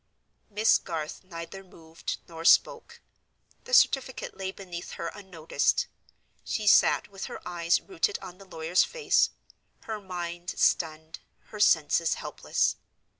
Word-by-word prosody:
Miss 215 Hz, +1 st, +4 dB
Garth 155 Hz, 0 st, -5 dB
neither 185 Hz, +1 st, -8 dB
moved 165 Hz, -3 st, -7 dB
nor 165 Hz, -1 st, -8 dB
spoke. -, -, +3 dB, 0.6 s
The -, -, -10 dB
certificate 265 Hz, -, +2 dB
lay 190 Hz, -1 st, -4 dB
beneath 180 Hz, -3 st, -8 dB
her 170 Hz, -, -4 dB
unnoticed. 185 Hz, -6 st, -1 dB, 0.6 s
She 215 Hz, -, -3 dB
sat 205 Hz, -, +5 dB
with 195 Hz, -1 st, -7 dB
her -, -, -7 dB
eyes 170 Hz, -1 st, +1 dB
rooted 390 Hz, +2 st, -1 dB
on 180 Hz, +1 st, -10 dB
the 195 Hz, -, -13 dB
lawyer's 175 Hz, -1 st, +1 dB
face; 475 Hz, -3 st, +2 dB, 0.5 s
her 220 Hz, -2 st, -6 dB
mind 175 Hz, -2 st, -5 dB
stunned, 160 Hz, -1 st, 0 dB, 0.3 s
her 210 Hz, -, -9 dB
senses 165 Hz, -3 st, +3 dB
helpless. -, -, -1 dB
180 Hz, 125 wpm, -28 LUFS, 165-200 Hz, 0.6 s, sat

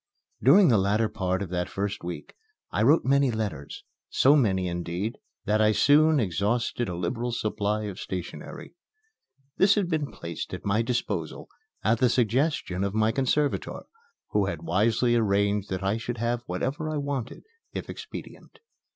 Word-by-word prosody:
During 170 Hz, -, +6 dB
the 110 Hz, -5 st, +4 dB
latter 105 Hz, +3 st, +2 dB
part 95 Hz, -3 st, -2 dB
of 95 Hz, -, -7 dB
that 90 Hz, 0 st, -2 dB
first 100 Hz, -1 st, -3 dB
week 85 Hz, 0 st, -6 dB, 0.4 s
I -, -, 0 dB
wrote 145 Hz, +9 st, +4 dB
many 140 Hz, 0 st, +3 dB
letters, 105 Hz, -, -4 dB, 0.3 s
so 140 Hz, +3 st, +5 dB
many, 95 Hz, -9 st, +2 dB
indeed, 85 Hz, +5 st, -3 dB, 0.3 s
that 110 Hz, 0 st, +2 dB
I 110 Hz, 0 st, +4 dB
soon 150 Hz, +7 st, +5 dB
exhausted 110 Hz, +4 st, 0 dB
a 90 Hz, -, -4 dB
liberal 115 Hz, +8 st, -2 dB
supply 105 Hz, -1 st, -1 dB
of 100 Hz, -3 st, -6 dB
stationery. 90 Hz, -2 st, -7 dB, 0.8 s
This 200 Hz, +1 st, +5 dB
had 200 Hz, -4 st, 0 dB
been 155 Hz, -4 st, -1 dB
placed 85 Hz, -1 st, -6 dB
at -, -, -11 dB
my 100 Hz, +3 st, +2 dB
disposal 105 Hz, -, -3 dB, 0.3 s
at 110 Hz, +2 st, +2 dB
the 125 Hz, -1 st, +4 dB
suggestion 120 Hz, -, +1 dB
of 100 Hz, +1 st, -2 dB
my 110 Hz, 0 st, +3 dB
conservator, 135 Hz, +4 st, 0 dB, 0.5 s
who 105 Hz, -2 st, +2 dB
had -, -, -4 dB
wisely 110 Hz, +6 st, +2 dB
arranged 100 Hz, -2 st, +1 dB
that 95 Hz, 0 st, -3 dB
I 100 Hz, +3 st, +1 dB
should 120 Hz, +1 st, -4 dB
have 120 Hz, +1 st, -1 dB
whatever 135 Hz, -, -2 dB
I 155 Hz, -, -2 dB
wanted, 140 Hz, -4 st, -4 dB, 0.3 s
if -, -, -5 dB
expedient. -, -, -9 dB
110 Hz, 160 wpm, -26 LUFS, 100-125 Hz, 0.8 s, During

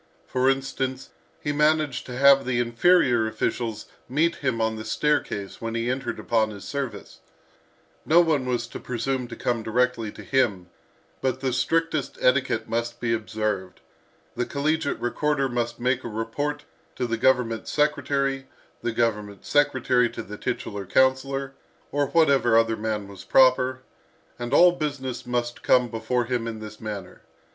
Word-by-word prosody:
For 130 Hz, +1 st, +1 dB
instance, 135 Hz, -1 st, -2 dB, 0.3 s
he 145 Hz, -, -1 dB
managed 150 Hz, -2 st, +1 dB
to 125 Hz, -1 st, -6 dB
have 140 Hz, 0 st, +6 dB
the 125 Hz, -1 st, 0 dB
inferior 120 Hz, -1 st, +3 dB
officials 110 Hz, 0 st, -2 dB, 0.2 s
meet 165 Hz, +6 st, +1 dB
him 130 Hz, -5 st, -1 dB
on 110 Hz, 0 st, 0 dB
the 110 Hz, -, -6 dB
staircase 110 Hz, -4 st, -1 dB
when 115 Hz, 0 st, -3 dB
he 115 Hz, +2 st, 0 dB
entered 135 Hz, +1 st, -3 dB
upon 110 Hz, -2 st, +1 dB
his 100 Hz, -2 st, -9 dB
service; 130 Hz, -8 st, -5 dB, 0.8 s
no 165 Hz, +2 st, +5 dB
one 155 Hz, -7 st, +2 dB
was 120 Hz, -1 st, 0 dB
to -, -, -7 dB
presume 125 Hz, +1 st, -2 dB
to 120 Hz, -, -8 dB
come 120 Hz, -1 st, -1 dB
directly 115 Hz, -1 st, 0 dB
to -, -, -10 dB
him, 100 Hz, -10 st, 0 dB, 0.5 s
but 130 Hz, -1 st, 0 dB
the 130 Hz, -2 st, 0 dB
strictest 165 Hz, +6 st, 0 dB
etiquette -, -, +2 dB
must 115 Hz, +1 st, -2 dB
be 115 Hz, -1 st, 0 dB
observed; 105 Hz, -4 st, -3 dB, 0.6 s
the -, -, 0 dB
collegiate 150 Hz, +1 st, -1 dB
recorder 140 Hz, +3 st, 0 dB
must 120 Hz, -2 st, -2 dB
make 125 Hz, +1 st, 0 dB
a -, -, -4 dB
report 130 Hz, +7 st, -3 dB, 0.3 s
to 125 Hz, -, -1 dB
the 115 Hz, -1 st, -1 dB
government 115 Hz, -2 st, +1 dB
secretary, 140 Hz, -2 st, 0 dB, 0.3 s
the 120 Hz, -, -1 dB
government 105 Hz, -4 st, -1 dB
secretary 130 Hz, -4 st, +2 dB
to -, -, -7 dB
the 105 Hz, -, -8 dB
titular 105 Hz, -3 st, -4 dB
councillor, 130 Hz, +3 st, +1 dB, 0.4 s
or 145 Hz, 0 st, +1 dB
whatever 135 Hz, -8 st, +4 dB
other 115 Hz, 0 st, +3 dB
man 105 Hz, -2 st, -3 dB
was 100 Hz, -2 st, -11 dB
proper, 130 Hz, 0 st, +4 dB, 0.6 s
and 120 Hz, 0 st, -4 dB
all 180 Hz, 0 st, +7 dB
business 140 Hz, -7 st, -4 dB
must 120 Hz, -1 st, -2 dB
come 125 Hz, -1 st, +3 dB
before 115 Hz, +2 st, -1 dB
him 120 Hz, -1 st, -2 dB
in 115 Hz, -1 st, -4 dB
this 110 Hz, 0 st, -9 dB
manner. 105 Hz, -4 st, -7 dB
125 Hz, 155 wpm, -25 LUFS, 115-135 Hz, 0.8 s, all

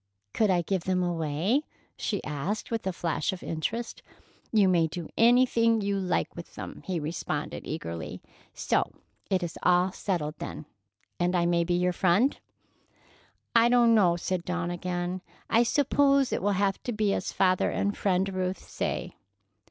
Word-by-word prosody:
"Could 215 Hz, -2 st, +2 dB
I 175 Hz, -2 st, +2 dB
give 185 Hz, 0 st, -2 dB
them 185 Hz, -1 st, +1 dB
away?" 170 Hz, -, 0 dB, 0.3 s
she 205 Hz, -, -2 dB
asked 150 Hz, +11 st, -3 dB
with 225 Hz, -4 st, -2 dB
a -, -, +1 dB
flash 170 Hz, -3 st, -1 dB
of 190 Hz, -, -7 dB
interest. 225 Hz, +9 st, -3 dB, 0.5 s
"You 210 Hz, -4 st, +4 dB
may 170 Hz, -3 st, +3 dB
do 165 Hz, 0 st, -6 dB
anything 230 Hz, -1 st, +4 dB
you 200 Hz, 0 st, 0 dB
like 185 Hz, -2 st, -1 dB
with 170 Hz, -, -10 dB
them," -, -, -7 dB
he 180 Hz, -3 st, -1 dB
responded 150 Hz, -1 st, -4 dB
eagerly. 85 Hz, -, -5 dB, 0.4 s
"So -, -, 0 dB, 0.4 s
it 185 Hz, -2 st, +1 dB
is 170 Hz, -, -5 dB
all 180 Hz, +1 st, +3 dB
settled, 165 Hz, -6 st, -3 dB
then, -, -, -6 dB, 0.5 s
and 180 Hz, +1 st, +1 dB
I 170 Hz, -1 st, +2 dB
may 170 Hz, 0 st, +2 dB
be 175 Hz, +1 st, 0 dB
your 180 Hz, 0 st, +1 dB
friend?" 195 Hz, +10 st, +3 dB, 1.2 s
"I 230 Hz, +1 st, +6 dB
don't 240 Hz, -1 st, +5 dB
know," 185 Hz, -6 st, +4 dB
said 175 Hz, 0 st, -2 dB
Dawn 180 Hz, -1 st, -2 dB
again. 175 Hz, +1 st, -3 dB, 0.3 s
"I 230 Hz, -, +5 dB
suppose 275 Hz, +1 st, +3 dB
it -, -, -1 dB
will 205 Hz, +2 st, +1 dB
have 195 Hz, 0 st, 0 dB
to 245 Hz, -, -3 dB
be 210 Hz, -3 st, +1 dB
as -, -, -2 dB
father 185 Hz, -1 st, +2 dB
and 200 Hz, +1 st, -1 dB
Friend 190 Hz, -1 st, +1 dB
Ruth 185 Hz, 0 st, -1 dB
say." -, -, -3 dB
185 Hz, 165 wpm, -28 LUFS, 175-215 Hz, 1.2 s, I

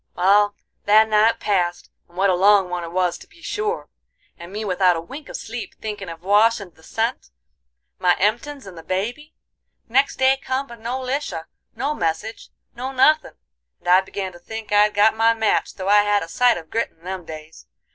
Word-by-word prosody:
"Wal, 205 Hz, +3 st, +4 dB, 0.3 s
that 215 Hz, +2 st, +6 dB
night 215 Hz, +1 st, +3 dB
passed, 175 Hz, -4 st, -1 dB, 0.2 s
and 175 Hz, -, -21 dB
what 195 Hz, 0 st, +3 dB
a -, -, +2 dB
long 195 Hz, 0 st, +4 dB
one 175 Hz, -1 st, -3 dB
it 165 Hz, -, -7 dB
was 180 Hz, -1 st, 0 dB
to -, -, -15 dB
be -, -, -22 dB
sure! 425 Hz, +3 st, -3 dB, 0.5 s
and 170 Hz, 0 st, -11 dB
me 215 Hz, +2 st, -4 dB
without 185 Hz, -2 st, +3 dB
a -, -, -2 dB
wink 275 Hz, -, -10 dB
of -, -, -5 dB
sleep, 230 Hz, +1 st, -7 dB
thinkin' 205 Hz, -4 st, -6 dB
of 165 Hz, 0 st, -10 dB
Wash 215 Hz, +4 st, +4 dB
and 190 Hz, -4 st, -10 dB
the 160 Hz, -, -23 dB
cent, 225 Hz, -, -3 dB, 0.7 s
my 180 Hz, -1 st, +3 dB
emptins 240 Hz, +7 st, -1 dB
and 190 Hz, -2 st, -10 dB
the 165 Hz, -, -9 dB
baby. 230 Hz, -, -4 dB, 0.5 s
Next 270 Hz, +4 st, +2 dB
day 265 Hz, +1 st, +3 dB
come, 265 Hz, 0 st, -2 dB
but 235 Hz, -3 st, -12 dB
no 240 Hz, +3 st, -3 dB
Lisha, 260 Hz, -, -3 dB, 0.3 s
no 285 Hz, +3 st, -1 dB
message, 215 Hz, -, -3 dB, 0.3 s
no 255 Hz, +3 st, -4 dB
nuthin', 305 Hz, +4 st, +3 dB, 0.4 s
and -, -, -15 dB
I 180 Hz, +1 st, +6 dB
began 190 Hz, 0 st, -5 dB
to 175 Hz, -, -14 dB
think 220 Hz, +4 st, -8 dB
I'd 210 Hz, 0 st, +4 dB
got 210 Hz, +2 st, +4 dB
my 225 Hz, +1 st, +3 dB
match 220 Hz, -1 st, 0 dB
though 190 Hz, 0 st, -4 dB
I 205 Hz, 0 st, +6 dB
had 205 Hz, 0 st, +1 dB
a -, -, -7 dB
sight 245 Hz, +7 st, +3 dB
of 160 Hz, -2 st, -11 dB
grit 230 Hz, +1 st, 0 dB
in 160 Hz, -, -32 dB
them 185 Hz, 0 st, -5 dB
days. 155 Hz, -, -11 dB
205 Hz, 205 wpm, -22 LUFS, 180-235 Hz, 0.7 s, that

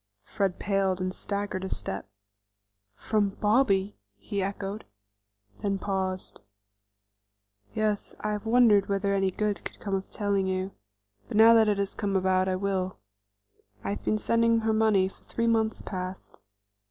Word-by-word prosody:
Fred 195 Hz, -, -1 dB
paled 195 Hz, -2 st, 0 dB
and 185 Hz, 0 st, -2 dB
staggered 200 Hz, -2 st, -3 dB
a 190 Hz, -, -3 dB
step. 95 Hz, 0 st, -4 dB, 0.9 s
"From 210 Hz, -2 st, +1 dB
Bobby!" 210 Hz, -3 st, +2 dB, 0.2 s
he 195 Hz, -, -3 dB
echoed, 195 Hz, +2 st, -4 dB, 0.8 s
then 200 Hz, -1 st, 0 dB
paused. 190 Hz, -, -3 dB, 1.3 s
"Yes, 215 Hz, -1 st, 0 dB
I 215 Hz, -, -2 dB
have 210 Hz, +1 st, -4 dB
wondered 225 Hz, -4 st, +5 dB
whether 200 Hz, 0 st, +1 dB
any 195 Hz, -1 st, +2 dB
good 210 Hz, +2 st, -2 dB
could -, -, -7 dB
come 200 Hz, -, -4 dB
of 190 Hz, 0 st, -2 dB
telling 200 Hz, -2 st, 0 dB
you; 185 Hz, +1 st, -2 dB, 0.6 s
but -, -, -3 dB
now 225 Hz, +1 st, +8 dB
that 225 Hz, -1 st, +5 dB
it 205 Hz, -1 st, +2 dB
has 200 Hz, -1 st, 0 dB
come 200 Hz, -2 st, -2 dB
about, 185 Hz, 0 st, +2 dB
I 185 Hz, -, +1 dB
will. 190 Hz, -1 st, -2 dB, 0.9 s
I 100 Hz, -, -2 dB
have 100 Hz, -, -5 dB
been 215 Hz, -, +1 dB
sending 230 Hz, +1 st, +2 dB
her 220 Hz, 0 st, +1 dB
money 215 Hz, -4 st, +3 dB
for 190 Hz, -, -14 dB
three 230 Hz, -, -2 dB
months 225 Hz, -1 st, +1 dB
past. 185 Hz, -, -6 dB
200 Hz, 155 wpm, -28 LUFS, 190-215 Hz, 1.3 s, now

